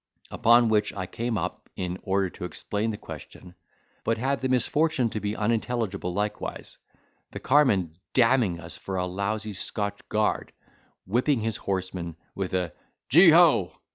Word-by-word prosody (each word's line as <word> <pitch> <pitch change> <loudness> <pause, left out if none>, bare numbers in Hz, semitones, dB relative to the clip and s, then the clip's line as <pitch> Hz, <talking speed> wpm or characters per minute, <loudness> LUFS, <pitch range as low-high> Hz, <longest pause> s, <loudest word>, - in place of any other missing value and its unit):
Upon 120 0 +5
which 105 -1 +2
I 95 -2 -3
came 115 +4 -3
up, 90 0 -5
in 90 0 -4
order 95 0 +1
to - - -10
explain 105 +4 -3
the 105 - -3
question, 90 -2 -11 0.5
but 115 - +1
had 135 +4 0
the 130 - -1
misfortune 130 0 +2
to 110 - -3
be 105 +1 -3
unintelligible 110 -4 -1
likewise, 105 +3 -4 0.5
the - - -5
carman 100 - +2 0.2
damning 115 -8 +3
us 85 -1 -8
for 95 +3 -5
a 90 - 0
lousy 105 +3 -3
Scotch 100 +1 -3
guard, 105 0 0 0.5
whipping 120 +5 +1
his 110 -1 -2
horses 95 -3 -3 0.2
with 95 -1 -3
a 90 -3 -1 0.4
"Gee 170 +7 +8
ho!" 160 - +5
105 Hz, 150 wpm, -26 LUFS, 95-120 Hz, 0.5 s, Gee